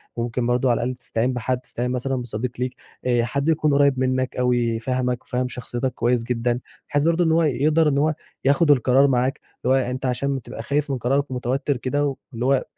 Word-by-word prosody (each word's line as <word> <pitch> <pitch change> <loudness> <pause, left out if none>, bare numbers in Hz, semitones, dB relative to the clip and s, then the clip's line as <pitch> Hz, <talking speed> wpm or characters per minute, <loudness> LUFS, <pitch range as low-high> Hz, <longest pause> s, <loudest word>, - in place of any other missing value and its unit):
وممكن 120 +1 -2
برضه 125 +1 +2
على 115 - +2
الأقل 125 +1 -2
تستعين 125 0 -1
بحد 125 +1 -1
تستعين 125 0 -4
مثلًا 130 +1 -1
بصديق 120 -1 -3
ليك 125 0 -2 0.3
آآ، 120 -2 +2
حد 140 +5 -1
يكون 155 -2 +2
قريّب 140 -2 +3
منك 130 0 0
أوي، 120 -2 +1
فاهمك 125 +1 -1
وفاهم 125 0 -2
شخصيتك 125 0 -4
كويس 120 -1 +1
جدًا، 120 0 -1 0.3
بحيث 145 -1 +1
برضه 170 +1 +3
إن 160 - +2
هو 165 +1 +4
يقدر 150 +3 +3
إن 140 - 0
هو 150 +2 +2 0.3
ياخد 145 +2 +4
القرار 135 +1 +4
معاك، 130 0 +1 0.3
اللي 130 +1 +4
هوأنت 130 0 -1
عشان 135 +2 0
بتبقى 115 -2 -8
خايف 145 +3 0
من 135 - 0
قرارك 135 +3 0
ومتوّتر 130 +2 -1
كده 130 +4 -2 0.3
اللي 120 +2 -3
هو 135 -1 +3
130 Hz, 195 wpm, -23 LUFS, 125-140 Hz, 0.3 s, هو